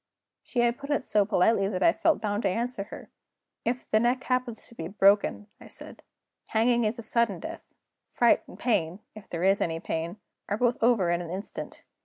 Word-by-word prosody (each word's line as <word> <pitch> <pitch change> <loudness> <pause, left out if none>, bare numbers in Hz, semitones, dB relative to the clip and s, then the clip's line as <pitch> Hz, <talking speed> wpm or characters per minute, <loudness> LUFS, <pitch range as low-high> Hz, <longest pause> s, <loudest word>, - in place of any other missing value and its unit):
She 245 - -1
had 240 +1 +1
put 280 +1 -8
it 290 -3 0
so 210 -1 +3
politely 195 0 +3
that 190 -2 -2
I 335 - +6
felt 325 - +2
bound 205 0 -1
to - - +1
answer 230 0 -2
her. - - -11 0.5
'If 245 +2 -2
the 215 - +3
neck 245 +3 +1
happens 250 -3 -2
to - - -15
be 165 -7 -6
broken,' 200 +2 +3
I - - -13
said, - - -11 0.5
'hanging 235 +1 +2
is 215 +2 -1
a 235 - -6
sudden 230 -6 +1
death; - - -7 0.5
fright 240 -1 +3
and - - -12
pain 200 -6 0
(if 215 -2 -13
there 170 0 -3
is 195 +2 +3
any 165 -1 -1
pain) 165 +3 -4 0.3
are 205 - 0
both 245 +1 +1
over 225 -7 +3
in 175 0 0
an 170 - -7
instant. 190 +4 -6
215 Hz, 205 wpm, -27 LUFS, 195-240 Hz, 0.5 s, I